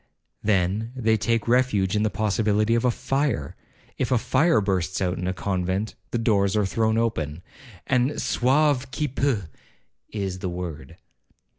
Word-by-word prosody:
Then 105 +3 0
they 110 -3 +2
take 115 +1 0
refuge 115 -6 +2
in 105 - +2
the 110 - +2
possibility 110 +1 +1
of 115 - +2
a 125 - +4
fire, 135 - -1 0.4
(if 130 - 0
a 125 - +4
fire 130 +4 +3
bursts 95 -3 -1
out 90 -2 -1
in 90 - -2
a - - +1
convent, 95 +2 -2 0.2
the - - -1
doors 105 -3 +2
are 105 - +2
thrown 110 +4 +1
open, 85 -9 -1 0.4
and 130 +2 +1
'Sauve 130 0 +2
qui 150 +3 -2
peut,' 130 -6 0 0.6
is 95 -3 -4
the 90 - -3
word). 85 -3 -6
110 Hz, 155 wpm, -24 LUFS, 95-125 Hz, 0.6 s, a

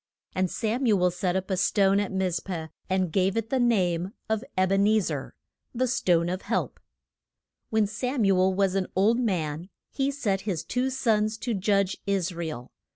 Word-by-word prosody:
And 185 -1 0
Sam 240 +6 -1
u 210 -4 +4
el 180 0 +3
set 180 +1 -1
up 190 +1 -2
a - - +2
stone 195 +2 +3
at 205 - -2
Miz 185 -3 0
peh, 165 -3 -5 0.2
and 185 -2 +1
gave 190 +4 +1
it 225 0 -2
the 265 - +2
name 190 -6 +1 0.2
of 220 +1 0
Eb 185 0 +2
en 195 +1 +4
e 215 +1 +4
zer 150 -8 -4 0.4
"The 255 +2 +2
Stone 175 -8 +2
of 185 +2 -2
Help." - - -2 0.9
When 220 -1 +2
Sam 245 +3 -1
u 195 -1 +4
el 185 +1 +3
was 195 -1 +2
an 195 -1 0
old 215 +6 +3
man 175 -7 -2 0.2
he 270 0 0
set 215 -9 -1
his 185 -7 -3
two 255 +1 -1
sons 220 -4 +1
to 240 +1 -2
judge 200 -1 +1
Is 190 -2 0
ra 170 0 -4
el. 125 -6 -7
195 Hz, 200 wpm, -26 LUFS, 180-220 Hz, 0.9 s, u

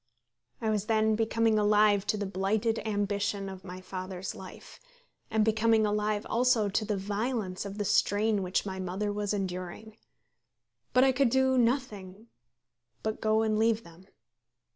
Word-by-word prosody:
I 220 -1 0
was 210 -1 -1
then 220 -1 +2
becoming 225 0 +2
alive 210 -1 +3
to 210 - +1
the 205 - -2
blighted 200 +4 0
ambition 205 -1 -1
of 190 -1 -8
my 185 -1 -8
father's 185 0 -6
life, 185 - -12 0.5
and 220 -1 +2
becoming 220 0 +3
alive 210 0 0
also 235 -3 +2
to 205 +3 0
the 210 -1 -2
violence 205 -1 -3
of 200 0 -6
the 205 - -2
strain 205 +2 +2
which 185 +1 -1
my 190 -1 -5
mother 190 +3 -2
was 205 -1 -2
enduring. 195 +2 -5 0.9
But 255 - +5
I 265 - +5
could 265 -1 +2
do 265 +1 +3
nothing 230 -5 -1 0.7
but 220 0 -3
go 220 0 +2
and 215 -1 +1
leave 225 0 +2
them. 170 +3 -16
210 Hz, 155 wpm, -29 LUFS, 195-220 Hz, 0.9 s, But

